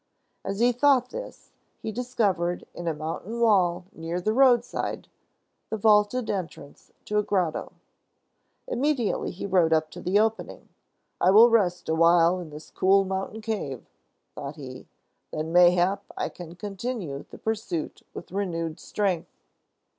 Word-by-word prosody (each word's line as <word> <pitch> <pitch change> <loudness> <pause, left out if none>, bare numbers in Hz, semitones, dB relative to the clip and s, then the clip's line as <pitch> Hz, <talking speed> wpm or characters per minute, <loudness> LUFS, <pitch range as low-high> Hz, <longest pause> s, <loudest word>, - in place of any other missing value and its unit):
As 195 +1 -3
he 240 +1 +4
thought 255 0 +3
this, - - -8 0.3
he 220 - -3
discovered, 205 -8 -1
in 175 - -6
a 165 - +1
mountain 165 +9 -5
wall 185 -6 +3
near 165 +2 -4
the 215 +4 0
roadside, 245 -2 +2 0.6
the 220 - -2
vaulted 210 +3 +3
entrance 165 -7 -6
to 210 0 +1
a - - +3
grotto. 185 -6 -1 0.9
Immediately 275 - 0
he 185 - -6
rode 180 -4 +3
up 155 -1 +2
to - - -9
the 185 +3 +1
opening. 220 +1 -1 0.5
"I 180 - +5
will 225 +5 +8
rest 185 -6 +2
a 160 - +1
while 170 +2 +4
in 175 -3 -8
this 150 +1 -11
cool 195 +1 +3
mountain 190 +3 -4
cave," 205 - -4 0.5
thought 140 +1 -7
he. 130 -4 -10 0.4
"Then, 155 +1 -4
mayhap, 180 +3 +4
I - - -1
can 175 -1 -10
continue 195 - -5
the - - -11
pursuit 215 -7 -3
with - - -10
renewed 165 -5 -3
strength." 195 -5 -2
190 Hz, 145 wpm, -26 LUFS, 170-220 Hz, 0.9 s, will